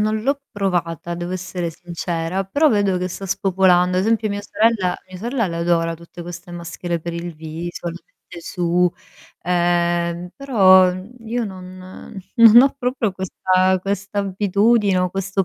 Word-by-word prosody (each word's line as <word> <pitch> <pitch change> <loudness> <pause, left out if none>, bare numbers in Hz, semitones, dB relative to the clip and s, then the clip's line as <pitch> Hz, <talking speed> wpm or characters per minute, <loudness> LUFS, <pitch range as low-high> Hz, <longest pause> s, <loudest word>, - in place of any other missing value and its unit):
non 215 0 0
l'ho 280 +3 0
provata 175 -4 -2
devo 175 +1 -5
essere 180 -1 -4
sincera, 170 +2 -4
però 285 +11 +2
vedo 205 -6 +2
che 180 - -2
sta 195 +2 -7
spopolando. 180 -1 +2
Ad 185 - +1
esempio 225 0 +1
mia 200 0 -3
sorella 205 -3 +1
mia 185 0 -9
sorella 235 +2 -1
l'adora 170 0 0
tutte 170 +1 -11
queste 175 +1 -9
maschere 170 0 -4
per 170 +2 -5
il 170 0 -5
viso, 160 +3 -6
le 170 +1 -7
mette 170 - -14
su. 175 +1 +1 0.5
Ehm, 175 0 0
però, 190 -9 +5
mhmm, 185 +4 -9 0.2
io 235 +1 -1
non 185 0 -10 0.2
non 230 +1 +9
ho 275 - +2
proprio 250 -5 -1
questa 185 0 +1
questa 200 +1 -3
abitudine 200 +1 +2
o 180 0 0
questo 195 +1 -1
185 Hz, 155 wpm, -20 LUFS, 175-205 Hz, 0.5 s, non